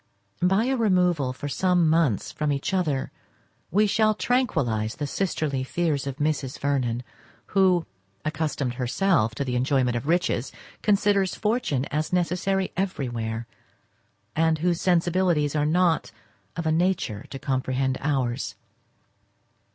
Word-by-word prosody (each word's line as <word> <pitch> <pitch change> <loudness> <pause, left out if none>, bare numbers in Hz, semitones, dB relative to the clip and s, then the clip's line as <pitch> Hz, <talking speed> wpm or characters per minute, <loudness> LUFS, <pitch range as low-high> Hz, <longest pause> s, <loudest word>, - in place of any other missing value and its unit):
By 190 +4 +3
a 265 +2 +1
removal 180 - +2
for 130 +3 -6
some 180 +2 +2
months 155 - +2
from 150 -1 -1
each 140 +6 -2
other 150 -8 0 0.6
we 210 +5 +3
shall 215 +1 +3
tranquillise 125 - 0
the 145 - -3
sisterly 145 -5 -1
fears 145 -1 -1
of 135 - -3
Mrs. 145 -3 -1
Vernon, 125 -4 -1 0.5
who, 185 -4 +4 0.4
accustomed 145 -4 -1
herself 125 - +1
to 140 - -2
the 125 -1 -2
enjoyment 130 -1 +1
of 120 +4 -3
riches, 170 -6 +1 0.3
considers 200 -2 +2
fortune 210 - 0
as 155 +3 -1
necessary 180 +2 0
everywhere, 120 - -2 0.9
and 160 0 +3
whose 170 +1 0
sensibilities 175 -4 +2
are 150 0 +2
not 170 0 +2 0.4
of 165 - -4
a 160 - +2
nature 160 - 0
to 135 - -6
comprehend 130 0 -1
ours. 135 -3 -1
155 Hz, 130 wpm, -25 LUFS, 130-180 Hz, 0.9 s, who